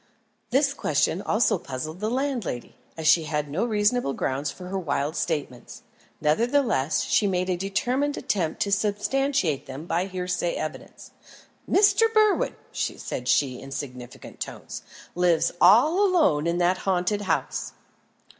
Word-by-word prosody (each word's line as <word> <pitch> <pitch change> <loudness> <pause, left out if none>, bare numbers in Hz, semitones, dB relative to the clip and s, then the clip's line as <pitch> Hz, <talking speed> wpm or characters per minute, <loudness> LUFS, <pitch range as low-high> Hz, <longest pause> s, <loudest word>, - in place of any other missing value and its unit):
This 280 +2 +2
question 155 - 0
also 210 -3 +1
puzzled 155 +2 -6
the 215 +2 -1
landlady, 250 - -3 0.2
as 160 - -5
she 160 +1 +5
had 150 -1 -2
no 175 +9 0
reasonable 215 - +1
grounds 135 +2 -2
for 180 - -9
her 195 0 -2
wild 150 -2 -2
statements. 145 -7 -4 0.4
Nevertheless, 220 - +1
she 205 - +2
made 185 -1 0
a - - +1
determined 245 +10 -1
attempt 170 -6 -1
to 200 - -4
substantiate 205 - 0
them 135 +4 -7
by 175 +2 -1
hearsay 180 -2 -2
evidence. 155 0 -7 0.6
"Mr. 435 +3 +4
Berwin," 430 -1 +3 0.2
said - - -4
she 130 -4 +2
in - - -10
significant 125 -3 -8
tones, - - -7 0.3
"lives 175 -2 +2
all 295 - +6
alone 315 - +3
in 170 +1 0
that 180 +1 +2
haunted 190 +2 0
house." 200 - -2
185 Hz, 135 wpm, -25 LUFS, 155-235 Hz, 0.6 s, all